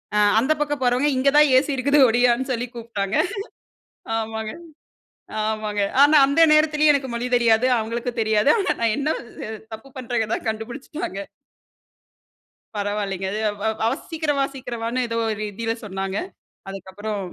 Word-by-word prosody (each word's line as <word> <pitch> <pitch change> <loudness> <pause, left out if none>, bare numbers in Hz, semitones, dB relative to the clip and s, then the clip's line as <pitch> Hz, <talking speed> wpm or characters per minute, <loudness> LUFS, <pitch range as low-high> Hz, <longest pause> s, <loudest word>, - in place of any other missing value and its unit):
அ - - +3 0.2
அந்த 265 +6 0
பக்கம் 290 -2 -1
போறவங்க, 250 +4 +2
இங்கே 275 +2 +3
தான் 300 -1 +6
ஏசி 290 +2 -3
இருக்குது, 285 +3 +3
ஒடியான்னு 245 +3 +2
சொல்லி 245 +1 -3
கூப்ட்டாங்க. 225 -2 -3 1.0
ஆமாங்க, 220 -1 -4 0.9
ஆமாங்க. 215 -1 -2 0.2
ஆனா 295 +2 +6
அந்த 280 +4 +1
நேரத்துலயே 305 -1 +4
எனக்கு 270 -2 -2
மொழி 235 +1 -2
தெரியாது. 230 0 +3
அவங்களுக்கும் 235 +2 -3
தெரியாது. 220 +4 +3
ஆனா, 395 - +1
நான் 225 -2 +2
என்ன 285 +1 -1 0.4
அ - - -5 0.2
தப்பு 220 +5 -12
பண்றேங்கிறத 235 -3 -1
கண்டுபுடிச்சுட்டாங்க. 225 - -5 1.6
பரவாயில்லங்க. 200 -2 -2
அது 210 - -3 0.5
அ - - +4
வ - - +1 0.2
சீக்கிரம் 310 -3 -1
வா - - +3
சீக்கிரம் 245 -3 -6
வான்னு 245 +2 -1
ஏதோ 230 0 -3
ஒரு 215 0 -4
ஹிந்தில 225 +3 -3
சொன்னாங்க. 195 -1 -4 0.5
அதுக்கப்புறம் 195 +2 -6
235 Hz, 140 wpm, -22 LUFS, 215-270 Hz, 1.6 s, தான்